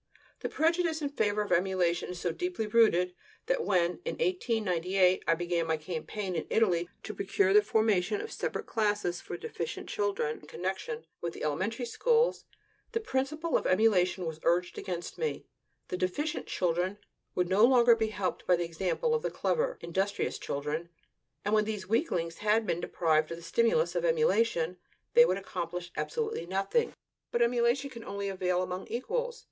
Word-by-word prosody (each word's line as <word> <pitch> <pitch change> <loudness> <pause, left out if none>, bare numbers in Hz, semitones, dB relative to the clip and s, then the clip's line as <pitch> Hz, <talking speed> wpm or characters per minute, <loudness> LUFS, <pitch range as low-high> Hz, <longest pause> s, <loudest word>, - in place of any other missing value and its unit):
This - - -4
prejudice 330 0 +1
in 285 - 0
favor 210 -7 +1
of 205 - -8
emulation 175 -1 +1
is 180 -1 -6
so 175 - -1
deeply 355 - -2
rooted 210 -5 +4 0.3
that - - +1
when, 175 -2 +1
in 485 - -3
1898, 195 - +2
I 165 - +4
began 170 -1 -1
my 160 -1 +1
campaign 180 +5 -4
in 160 - -3
Italy 175 -6 +2
to 215 - -5
procure 195 0 +1
the 210 - +8
formation 215 - +2
of 435 +2 -6
separate - - -3
classes 205 -5 0
for 175 - -6
deficient 170 -1 -5
children 200 -7 -1
in 150 - -16
connection 195 - -4 0.2
with 170 -1 -3
the - - -7
elementary 190 - -1
schools, 470 - +2 0.5
the 455 - +1
principle 305 -3 -1
of - - +2
emulation 185 -3 +3
was 160 -1 -4
urged 175 +1 +1
against 175 -2 -5
me: 470 -1 -2 0.4
the 180 - -2
deficient 290 - -2
children 180 +2 0 0.4
would 180 -1 +1
no 190 +4 +4
longer 240 -1 +7
be 220 -1 0
helped 200 -3 -3
by 180 - +6
the 170 0 -1
example 185 - -1
of 465 - +1
the - - -1
clever, - - 0
industrious 190 +4 -1
children; 150 +4 -3 0.6
and 205 - +1
when 215 -1 +4
these 210 -3 -4
weaklings 180 - 0
had 215 +2 +2
been 170 - 0
deprived 155 -3 +1
of 165 - -5
the 170 - -11
stimulus 235 - +2
of - - -1
emulation, 230 - +2 0.4
they 240 - +8
would 185 - +1
accomplish 175 -2 -5
absolutely 445 - -2
nothing. 195 - +1 0.4
But 235 - +3
emulation 240 +3 +2
can 235 -2 -9
only 200 -1 -4
avail 185 -1 0
among 185 +1 -5
equals. 480 - -2
195 Hz, 170 wpm, -30 LUFS, 175-240 Hz, 0.6 s, the